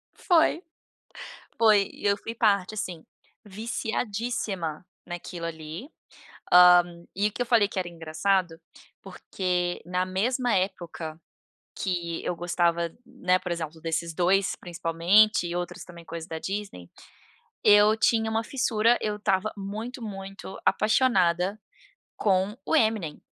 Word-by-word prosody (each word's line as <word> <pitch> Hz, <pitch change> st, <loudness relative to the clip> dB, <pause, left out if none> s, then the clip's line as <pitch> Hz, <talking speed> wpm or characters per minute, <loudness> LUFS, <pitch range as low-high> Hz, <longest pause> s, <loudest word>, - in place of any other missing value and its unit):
Foi. 330 Hz, -1 st, +3 dB, 1.0 s
Foi, 210 Hz, -3 st, +4 dB
e -, -, -10 dB
eu 200 Hz, 0 st, +3 dB
fui 230 Hz, -, -7 dB
parte, 205 Hz, -2 st, +2 dB
sim. 175 Hz, -4 st, -5 dB, 0.4 s
Viciadíssima 210 Hz, -5 st, -3 dB, 0.2 s
naquilo 175 Hz, -1 st, -6 dB
ali. 160 Hz, -, -7 dB, 0.6 s
Hã, 180 Hz, 0 st, +9 dB, 0.3 s
e 200 Hz, +2 st, +2 dB
o 210 Hz, -, -19 dB
que -, -, -5 dB
eu -, -, +1 dB
falei 230 Hz, -4 st, +4 dB
que 205 Hz, -, -9 dB
era 180 Hz, -, -3 dB
engraçado, 165 Hz, +1 st, -1 dB, 0.4 s
porque 180 Hz, -2 st, -3 dB
na 180 Hz, +1 st, -1 dB
mesma 240 Hz, +6 st, 0 dB
época 175 Hz, -4 st, -3 dB, 0.6 s
que 170 Hz, -3 st, -3 dB
eu 180 Hz, -, -1 dB
gostava, 170 Hz, -1 st, 0 dB, 0.2 s
né, 185 Hz, -8 st, +1 dB
por 180 Hz, -, -5 dB
exemplo, 165 Hz, -1 st, -4 dB
desses 165 Hz, +1 st, -2 dB
2 185 Hz, +3 st, +2 dB
principalmente 175 Hz, +4 st, +2 dB
e 170 Hz, -, -4 dB
outros 175 Hz, 0 st, -4 dB
também, 170 Hz, -1 st, -12 dB
coisa 165 Hz, 0 st, -7 dB
da 160 Hz, -, -5 dB
Disney, 195 Hz, -, -5 dB, 0.7 s
eu 210 Hz, +1 st, +6 dB
tinha 220 Hz, 0 st, +2 dB
uma 225 Hz, +1 st, 0 dB
fissura. 235 Hz, -2 st, +2 dB
Eu 210 Hz, -1 st, -1 dB
estava 200 Hz, 0 st, 0 dB
muito, 215 Hz, +6 st, -6 dB
muito 195 Hz, -2 st, -8 dB
apaixonada 200 Hz, -4 st, +2 dB, 0.6 s
com 195 Hz, +1 st, +1 dB
o -, -, 0 dB
Eminem. 215 Hz, -, 0 dB
190 Hz, 130 wpm, -26 LUFS, 170-215 Hz, 1.0 s, Hã